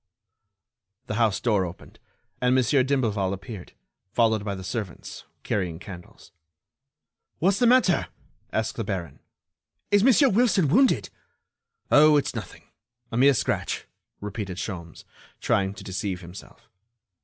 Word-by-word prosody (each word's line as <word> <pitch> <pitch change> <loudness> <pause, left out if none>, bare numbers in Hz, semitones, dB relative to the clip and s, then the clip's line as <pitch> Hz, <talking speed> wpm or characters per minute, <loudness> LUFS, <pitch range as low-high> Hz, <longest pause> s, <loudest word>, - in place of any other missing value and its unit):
The - - -4
house 110 -2 +1
door 105 -5 +2
opened, 90 0 -9 0.4
and 125 0 +3
Monsieur 130 +2 +3
d'Imblevalle 115 -8 0
appeared, 100 -1 -9 0.4
followed 110 -2 +2
by 100 -1 -3
the 95 - -8
servants, 100 -2 -6 0.2
carrying 90 -5 -2
candles. 90 -1 -12 1.1
"What's 195 +3 +2
the 245 - +4
matter?" 240 -8 +4 0.4
asked 110 0 -2
the 115 - -1
baron. 90 -8 -5 0.7
"Is 205 0 +5
Monsieur 265 +2 +5
Wilson 200 - +3
wounded?" 260 - +3 0.8
"Oh! 150 0 +7
it's 145 - -1
nothing—a 120 -1 -11
mere 135 +2 +5
scratch," - - -2 0.3
repeated 100 -2 -5
Sholmes, 85 -5 -7 0.3
trying 95 0 0
to - - -10
deceive 95 -1 -4
himself. 90 +2 -13
110 Hz, 120 wpm, -25 LUFS, 95-140 Hz, 1.1 s, Oh